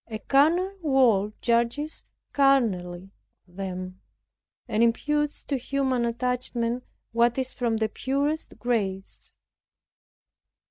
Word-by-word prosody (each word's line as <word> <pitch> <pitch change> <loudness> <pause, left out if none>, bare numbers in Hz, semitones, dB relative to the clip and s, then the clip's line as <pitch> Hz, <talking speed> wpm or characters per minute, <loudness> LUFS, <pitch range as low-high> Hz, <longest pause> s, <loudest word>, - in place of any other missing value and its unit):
A 220 -2 -5
carnal 330 - +2
world 235 - +3
judges 235 +6 0 0.3
carnally 195 -10 +2 0.4
of 175 - -23
them, 185 -1 -5 0.7
and 215 - 0
imputes 295 +6 +1
to 280 - -1
human 260 -1 0
attachment 240 0 -1 0.3
what 235 +1 +2
is 260 -1 -1
from 235 -2 0
the 220 0 +1
purest 280 +7 -2
grace. 195 -6 -3
240 Hz, 100 wpm, -26 LUFS, 215-275 Hz, 0.7 s, world